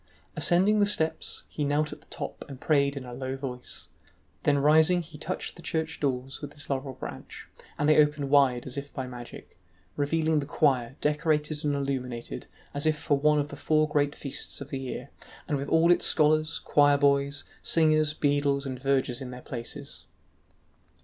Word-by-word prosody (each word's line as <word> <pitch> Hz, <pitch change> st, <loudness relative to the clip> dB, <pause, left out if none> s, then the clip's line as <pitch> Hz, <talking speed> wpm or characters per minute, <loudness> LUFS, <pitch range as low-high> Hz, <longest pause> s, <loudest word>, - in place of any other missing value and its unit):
Ascending 195 Hz, +4 st, +3 dB
the 205 Hz, -, +4 dB
steps, 160 Hz, -5 st, -1 dB
he 150 Hz, -, -4 dB
knelt 150 Hz, +1 st, 0 dB
at 150 Hz, -, -13 dB
the -, -, -24 dB
top -, -, -6 dB
and 135 Hz, -2 st, -9 dB
prayed 140 Hz, -2 st, +2 dB
in 130 Hz, -, -6 dB
a 125 Hz, -, -8 dB
low 130 Hz, +1 st, -4 dB
voice, 125 Hz, -2 st, -7 dB, 0.5 s
then 145 Hz, -1 st, +3 dB
rising 160 Hz, +5 st, +4 dB
he 160 Hz, -1 st, -13 dB
touched 185 Hz, +4 st, -4 dB
the 170 Hz, -, -12 dB
church 160 Hz, -1 st, -3 dB
doors 135 Hz, -1 st, -2 dB
with 145 Hz, -1 st, -7 dB
his 145 Hz, -1 st, -7 dB
laurel 135 Hz, -1 st, -3 dB
branch, -, -, -8 dB, 0.3 s
and 145 Hz, -, +1 dB
they 155 Hz, -, +5 dB
opened 150 Hz, -2 st, 0 dB
wide 135 Hz, -4 st, +4 dB
as 130 Hz, +2 st, -4 dB
if 140 Hz, +1 st, -10 dB
by 130 Hz, -, -4 dB
magic, 120 Hz, -5 st, -10 dB, 0.4 s
revealing 155 Hz, +2 st, +1 dB
the 140 Hz, -, -4 dB
choir 135 Hz, -5 st, +1 dB
decorated 150 Hz, 0 st, 0 dB
and 145 Hz, -1 st, +1 dB
illuminated 125 Hz, -, -4 dB, 0.3 s
as 145 Hz, +2 st, -1 dB
if 155 Hz, -1 st, +2 dB
for 145 Hz, -, +1 dB
one 150 Hz, +1 st, +4 dB
of 145 Hz, 0 st, 0 dB
the -, -, -7 dB
four 155 Hz, +2 st, +2 dB
great 145 Hz, -1 st, +1 dB
feasts 140 Hz, -, -6 dB
of 140 Hz, 0 st, -8 dB
the 135 Hz, -, -2 dB
year, 130 Hz, -1 st, -6 dB, 0.4 s
and 145 Hz, -, 0 dB
with 140 Hz, +1 st, -4 dB
all 165 Hz, +2 st, +5 dB
its 175 Hz, -, +3 dB
scholars, 155 Hz, -1 st, +3 dB
choir 145 Hz, -1 st, +4 dB
boys, 140 Hz, 0 st, +2 dB, 0.2 s
singers, 155 Hz, -2 st, +3 dB
beadles, 145 Hz, -1 st, +1 dB
and 130 Hz, -2 st, -4 dB
vergers 135 Hz, -2 st, 0 dB
in 130 Hz, -, -6 dB
their 125 Hz, 0 st, -8 dB
places. 120 Hz, -2 st, -7 dB
145 Hz, 185 wpm, -28 LUFS, 135-155 Hz, 0.5 s, they